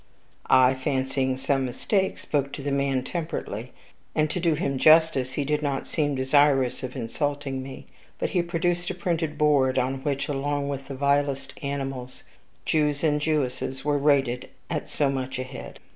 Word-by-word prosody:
I, 130 0 +6
fancying 130 0 -1
some 135 0 0
mistake, 190 - 0
spoke 140 -2 -1
to 140 - -6
the 145 - -1
man 140 -2 +1
temperately, 130 - -4 0.4
and, 155 -1 +2
to - - -2
do 165 -2 +2
him 140 -3 -1
justice, 155 -5 +5
he 140 +1 -1
did 150 +1 0
not 140 -2 -1
seem 145 -3 0
desirous 135 -1 +3
of 130 0 -6
insulting 135 +2 -2
us; 135 - -9 0.3
but - - -2
he 180 - +2
produced 175 0 -1
a 185 - -3
printed 165 -3 -1
board, 140 -4 +3
on 130 +1 0
which, 140 -1 -1
along 145 0 -1
with 135 -1 -5
the 135 - -6
vilest 140 0 0
animals, 135 -3 -4 0.4
Jews 150 -2 +1
and 150 -2 +2
Jewesses 135 -3 -1
were 145 -1 +2
rated 135 -4 +2 0.2
at - - -3
so 145 - +1
much 130 -1 -3
a 130 - -2
head. 130 0 -9
140 Hz, 170 wpm, -26 LUFS, 130-150 Hz, 0.4 s, I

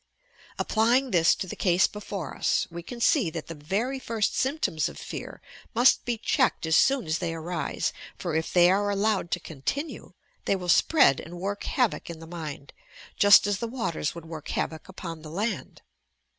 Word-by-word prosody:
Applying 240 +4 +2
this 170 -3 +4
to - - -4
the 185 - -7
case 180 -1 +3
before 200 -6 -5
us, - - +1
we 170 +1 -6
can 240 +8 -9
see 250 - +3
that 160 -1 -6
the 165 - -7
very 200 - -2
first 225 -4 -1
symptoms 265 - 0
of - - -12
fear - - -8 0.3
must 245 +3 +5
be 240 -1 -1
checked 215 - +1
as 160 0 +5
Boon 270 -5 -1
as 160 +1 -1
they 165 -2 -2
arise, 165 -2 -2 0.2
for, 175 -3 -4
if 160 +1 -1
they 175 0 +6
are 205 +1 +1
allowed 200 -2 0
to 180 - -1
continue, 170 - -5 0.3
they - - +2
will 180 -2 -5
spread 275 - +5
and 175 +2 -9
work 200 +2 -3
havoc 250 -8 0
in 170 - -6
the 165 - -11
mind, 155 -4 -7 0.4
just 205 -1 +7
as 205 -1 0
the 235 - -2
waters 225 - -3
would 170 -1 -9
work 160 -2 -8
havoc 160 +3 -3
upon 170 -4 -7
the 155 - -9
land. 200 +4 -4
185 Hz, 185 wpm, -27 LUFS, 165-225 Hz, 0.4 s, just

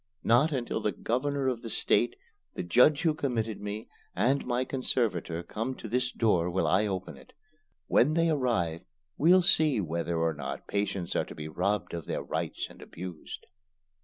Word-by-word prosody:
Not 125 +8 +4
until 120 -5 -2
the 105 - +1
Governor 135 +7 -1
of 125 -3 -1
the 115 - -6
State, - - +2 0.4
the - - -3
judge 125 - +4
who 160 -2 +3
committed 115 -8 -2
me, 105 +1 -5 0.3
and 135 +4 +2
my 125 +1 0
conservator 110 -10 -1
come 115 +8 -4
to 115 - -8
this 125 +2 0
door 90 -7 +2
will 95 +2 0
I 100 +4 +3
open 95 -7 -4
it. 65 - -17 0.5
When 150 - +3
they 165 0 +3
arrive, 115 - 0 0.4
we'll 180 +4 +6
see 155 -7 +4
whether 85 -1 -2
or 80 0 +1
not 70 -3 -6
patients 100 -3 -2
are - - +1
to - - -10
be 75 0 -6
robbed 95 +5 -1
of 85 -2 -5
their - - -2
rights - - -3
and - - -15
abused." 90 -2 -8
110 Hz, 175 wpm, -29 LUFS, 90-130 Hz, 0.5 s, we'll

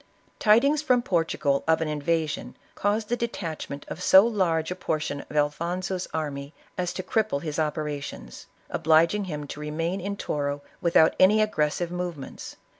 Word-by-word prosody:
Tidings 275 +8 +4
from 250 -5 +2
Portugal 165 - +1
of 160 0 +4
an 160 - -1
invasion, 155 +1 -2 0.2
caused 210 +1 -1
the 240 - +2
de 235 0 -1
tachment 155 -8 -6
of 175 - -7
so 190 +2 +7
large 180 -8 +1
a - - -2
portion 155 -5 -2
of 150 - -4
Alfonso's 175 +5 -1
army 145 -2 -4 0.2
as 180 -1 -1
to 185 - -4
cripple 215 -11 0
his 155 -1 -3
operations, 150 - -4 0.2
obliging 165 +6 +3
him 150 -5 -5
to 145 - -8
remain 165 +5 -2
in 200 +2 -4
Toro 145 -3 -2 0.2
without 165 -2 +4
any 205 +3 +6
aggressive 170 -5 0
movements. 175 -5 -6
165 Hz, 155 wpm, -26 LUFS, 150-195 Hz, 0.2 s, so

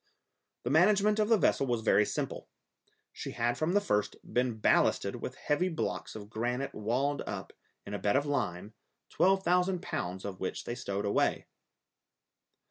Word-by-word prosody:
The 120 - -2
management 205 +6 +4
of 215 0 +2
the 225 - +6
vessel 135 - +2
was 120 -2 0
very 105 -1 +4
simple. - - -4 0.6
She - - -6
had 120 +1 0
from 155 +3 0
the - - +6
first 105 - 0
been 125 -2 -1
ballasted - - +2
with - - -6
heavy 175 +5 0
blocks 160 - -3
of 105 -2 -8
granite 120 +5 -2
walled 130 +7 0
up, - - -5 0.3
in 100 - -7
a 100 - -2
bed 100 +4 +1
of 140 +1 +2
lime, 105 -8 -2 0.4
twelve 190 +1 +3
thousand 180 +1 +2
pounds 90 - -4
of 95 -2 -5
which 95 - -3
they - - -4
stowed 100 -3 -3
away. 100 - +1
125 Hz, 165 wpm, -31 LUFS, -, 0.6 s, the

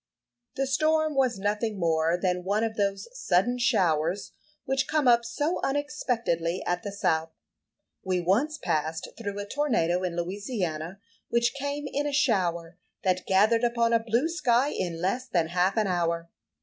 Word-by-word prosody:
The 270 +1 0
storm 310 +3 +2
was 260 -5 +2
nothing 210 +2 -1
more 165 0 +2
than 180 -1 0
one 205 +4 0
of 225 -1 -2
those 200 -2 -1
sudden 245 - +1
showers 180 -6 +1 0.3
which 265 0 0
come 305 -4 +1
up 235 -1 +5
so 295 +8 -1
unexpectedly 240 - -1
at 175 0 -1
the 205 - -5
south. 160 -5 0 0.7
We 185 -1 0
once 230 - +1
passed 160 - -2
through 205 -3 -5
a 205 - -4
tornado 200 - 0
in 180 -2 -2
Louisiana, 180 -2 -3 0.3
which 235 0 +2
came 285 +1 -4
in 285 +1 -2
a 290 - -3
shower 180 - 0 0.2
that 185 -1 0
gathered 215 +5 +4
upon 235 -1 +2
a 230 - +5
blue 235 +6 +1
sky 275 -6 +2
in 175 - -3
less 245 +8 -1
than 170 -8 0
half 180 +4 +1
an 215 - +3
hour. 170 -2 -1
205 Hz, 160 wpm, -27 LUFS, 175-255 Hz, 0.7 s, up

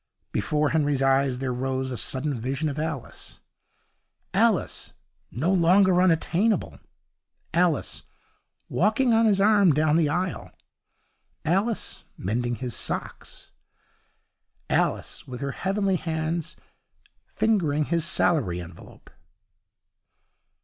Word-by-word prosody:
Before 150 +8 0
Henry's 145 -4 +1
eyes 135 -1 +2
there 130 -1 -2
rose 130 +1 -2
a - - -3
sudden 130 +5 -1
vision 135 +6 -2
of 145 +1 -5
Alice: 155 -5 -5 0.9
Alice - - +1 0.4
no 160 +10 0
longer 185 +1 +4
unattainable; 185 +4 +1 0.7
Alice 170 -2 0 0.6
walking 225 +6 +2
on 225 0 +4
his 200 -2 +3
arm 200 -4 +5
down 155 +1 +3
the 160 -3 +2
aisle; 180 +4 -2 1.0
Alice 200 +7 -1
mending 120 +5 -2
his 125 -1 -4
socks; - - -4 1.2
Alice - - -1
with 125 -2 -7
her 140 0 -2
heavenly 195 +4 0
hands 160 0 -3 0.7
fingering 160 -9 +1
his 170 0 0
salary 155 - +1
envelope. 85 -2 -12
155 Hz, 100 wpm, -25 LUFS, 135-185 Hz, 1.2 s, arm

